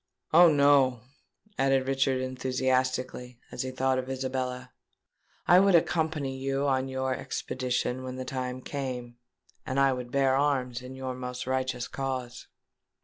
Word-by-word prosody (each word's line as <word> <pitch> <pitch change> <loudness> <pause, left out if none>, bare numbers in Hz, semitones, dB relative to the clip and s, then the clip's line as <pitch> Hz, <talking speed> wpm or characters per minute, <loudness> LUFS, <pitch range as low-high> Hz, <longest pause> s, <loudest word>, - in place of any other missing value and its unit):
Oh! 170 0 +8
no," 140 -4 +4 0.6
added 135 -1 +2
Richard, 135 -1 +1
enthusiastically, 130 -1 -1
as - - -4
he 130 - -3
thought 130 0 0
of 130 0 -5
Isabella, 130 -1 -3 0.8
"I 180 - +7
would 195 -1 +5
accompany 155 -5 0
you 135 +1 -1
on 130 -1 +1
your 130 0 -1
expedition 125 0 -2
when 130 0 -6
the 130 0 -5
time 130 -2 -4
came, 125 -4 -5 0.5
and 130 +1 -2
I 135 -1 +4
would 125 -1 -6
bear 135 -1 +3
arms 130 -4 0
in 130 +1 -9
your 130 -1 -4
most 125 0 -5
righteous 130 -1 -1
cause." 130 -2 -4
130 Hz, 145 wpm, -28 LUFS, 125-135 Hz, 0.8 s, Oh